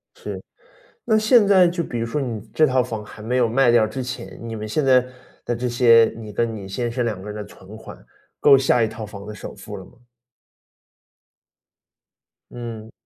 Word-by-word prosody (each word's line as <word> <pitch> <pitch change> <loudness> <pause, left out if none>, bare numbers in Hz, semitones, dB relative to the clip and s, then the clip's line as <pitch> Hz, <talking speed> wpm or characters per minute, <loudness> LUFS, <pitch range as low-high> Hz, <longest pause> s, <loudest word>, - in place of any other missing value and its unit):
是。 - - -7 0.6
那 220 -2 +3
现 215 0 +5
在 190 -3 +6
就 170 0 -2
比 120 - -5
如 115 - -2
说 145 +6 -2
你 120 -6 -3
这 155 - +5
套 130 -2 +2
房 115 -3 -5
还 105 - -12
没 120 +4 -1
有 120 -2 +3
卖 125 +2 +3
掉 115 -2 +4
之 130 +5 -5
前， 125 0 -7
你 115 -1 -6
们 110 -1 -5
现 145 +6 0
在 130 -1 +5 0.4
的 120 - -1
这 125 +1 -2
些 115 -2 +5
你 110 -2 -9
跟 115 +1 -1
你 100 -3 -8
先 120 +4 -3
生 125 +1 -2
两 110 -5 -3
个 95 - -11
人 105 - -7
的 105 - -6
存 100 +1 -14
款， 110 - -11 0.4
够 140 -2 +7
下 130 -2 +2
一 110 - +2
套 110 0 -7
房 100 -1 -10
的 105 - -7
首 - - -9
付 - - -9
了 - - -10
吗？ - - -18 2.6
嗯。 115 -2 -8
120 Hz, 220 characters per minute, -22 LUFS, 110-130 Hz, 2.6 s, 够